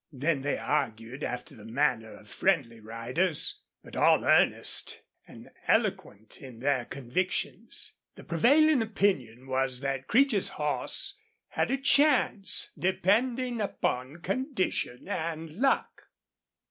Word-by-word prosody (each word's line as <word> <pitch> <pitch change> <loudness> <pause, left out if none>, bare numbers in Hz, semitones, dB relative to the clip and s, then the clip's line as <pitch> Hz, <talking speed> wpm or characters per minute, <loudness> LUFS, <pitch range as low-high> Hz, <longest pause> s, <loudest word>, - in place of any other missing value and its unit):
Then 145 +1 -1
they 145 +1 -1
argued, 120 -1 -2
after 125 - -5
the 110 - -14
manner 115 -1 0
of 105 - -16
friendly 135 - 0
riders, 120 - -1 0.2
but - - -12
all - - +4
earnest, - - +3 0.2
an - - -14 0.2
eloquent 105 +2 -1
in 130 -4 -10
their 130 -1 0
convictions. 140 +10 -3 0.2
The - - -12
prevailing 280 - +4
opinion 165 - -1
was 130 -1 -1
that 135 -1 -3
Creech's 245 -4 +3
horse 385 - -2 0.3
had - - -1
a 270 - +1
chance, 270 -7 +3
depending 235 +6 +1
upon 140 -6 -2
condition 195 - -2
and 165 -4 -4
luck. 265 - 0
155 Hz, 115 wpm, -28 LUFS, -, 0.3 s, all